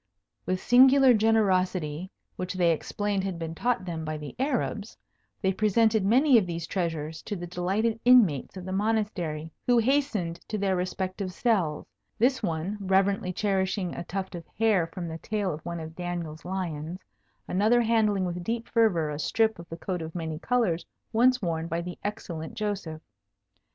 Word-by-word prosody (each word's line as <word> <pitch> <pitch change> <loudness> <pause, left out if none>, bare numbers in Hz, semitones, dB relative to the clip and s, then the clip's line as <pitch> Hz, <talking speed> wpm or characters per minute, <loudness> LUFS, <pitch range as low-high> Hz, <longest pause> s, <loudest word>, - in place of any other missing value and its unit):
With 185 0 0
singular 260 +2 +6
generosity, 185 -7 +1 0.3
which 185 +1 -4
they 175 -2 +3
explained 200 +4 -1
had 190 -3 -3
been 165 -1 -4
taught 240 +3 0
them 165 -3 -4
by 155 0 -3
the 150 -1 -8
Arabs, 250 -6 -2 0.5
they 190 0 +2
presented 215 +1 +3
many 250 +5 +5
of 190 - -3
these 170 -1 -4
treasures 160 -4 -3
to 210 - -5
the 175 -2 -5
delighted 195 +6 -1
inmates 215 - +4
of 180 - -7
the 185 - -5
Monastery, 190 -7 -1 0.2
who 245 -1 +5
hastened 225 -9 +1
to 215 - -2
their 195 -2 +1
respective 185 +1 -3
cells, 185 -8 0 0.3
this 255 +4 +2
one 175 +1 -2
reverently 195 -1 +1
cherishing 190 -1 -1
a - - -5
tuft 190 +2 -4
of 170 -1 -6
hair 210 -6 +3
from 170 +1 -6
the 160 0 -6
tail 205 -3 -2
of 155 +1 -8
one 170 0 -4
of 160 0 -8
Daniel's 170 -3 -5
lions; 175 -3 -4 0.5
another 215 +6 +3
handling 215 -4 +2
with 175 0 -4
deep 230 +3 -3
fervour 185 -10 +2
a 145 - -5
strip 220 +6 +1
of 170 - -11
the 165 - -6
coat 180 0 -3
of 160 +1 -7
many 160 -2 -4
colours 220 -7 +1 0.3
once 250 +1 +4
worn 165 -2 -1
by 165 0 -2
the 175 +1 -6
excellent 195 -3 -5
Joseph. 200 -8 -4
185 Hz, 170 wpm, -27 LUFS, 170-220 Hz, 0.5 s, singular